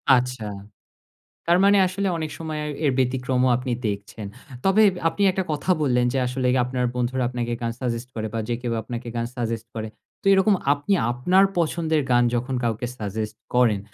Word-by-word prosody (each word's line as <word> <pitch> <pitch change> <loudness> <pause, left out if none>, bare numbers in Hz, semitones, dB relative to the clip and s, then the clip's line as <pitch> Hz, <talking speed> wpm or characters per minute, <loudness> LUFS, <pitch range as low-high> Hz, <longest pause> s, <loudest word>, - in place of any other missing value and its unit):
আচ্ছা। 125 -2 -1 1.0
তার 170 +1 +4
মানে 200 +1 +6
আসলে 190 +2 -2
অনেক 160 -2 -3
সময় 160 -2 -4
আয় 150 - -3
এর 140 - +3
ব্যতিক্রমও 130 0 +1
আপনি 125 0 -3
দেখছেন। 100 +1 -5 0.4
তবে 195 +3 +5 0.3
আপনি 185 +5 -3
একটা 190 0 -1
কথা 150 +5 -2
বললেন 125 -3 +2
যে 135 - 0
আসলে 125 +1 -1 0.2
আপনার 125 0 -2
বন্ধুরা 125 +1 -1
আপনাকে 120 -1 -3
গান 115 0 -1
সাজেস্ট 120 -1 -3
করে 110 -1 -2
বা, - - -1
যে 120 - 0
কেউ 120 -2 -2
আপনাকে 120 +1 -6
গান 115 0 -1
সাজেস্ট 115 -2 -3
করে। 110 -1 -4 0.3
তো - - -11
এরকম 195 +2 +4 0.2
আপনি 145 +7 -1 0.2
আপনার 180 +11 +4
পছন্দের 160 -1 +1
গান 120 0 +5
যখন 125 +2 -1
কাউকে 115 +1 -1
সাজেস্ট 110 +1 -4 0.2
করেন, 115 -5 +3
125 Hz, 175 wpm, -24 LUFS, 120-155 Hz, 1.0 s, মানে